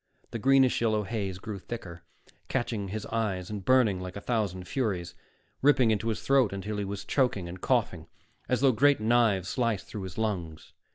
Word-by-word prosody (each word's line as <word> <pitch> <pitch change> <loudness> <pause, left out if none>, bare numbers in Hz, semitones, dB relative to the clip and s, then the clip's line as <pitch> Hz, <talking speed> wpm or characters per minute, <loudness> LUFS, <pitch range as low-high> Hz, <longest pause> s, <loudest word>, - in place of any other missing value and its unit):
The 115 - -4
greenish 135 +1 +4
yellow 110 -2 +2
haze 100 -3 -3
grew 100 +1 -6
thicker, 90 -6 -8 0.5
catching 115 -6 -2
his 105 +2 -5
eyes 105 -5 -2
and 105 -2 -5
burning 120 -5 +3
like 90 0 -7
a - - -4
thousand 100 -6 -2
furies, 95 -9 -2 0.5
ripping 130 -5 +5
into 110 +1 -1
his 110 - -2
throat 135 -6 +3
until 100 +2 -4
he 100 - -2
was 100 0 -5
choking 125 -10 +1
and 90 +1 -8
coughing, - - 0 0.4
as 125 - +1
though 135 -1 +5
great 140 +4 +4
knives 110 -5 +2
sliced 115 -6 -1
through 105 - -7
his 95 -1 -7
lungs. 90 -8 -3
105 Hz, 180 wpm, -28 LUFS, 95-120 Hz, 0.5 s, ripping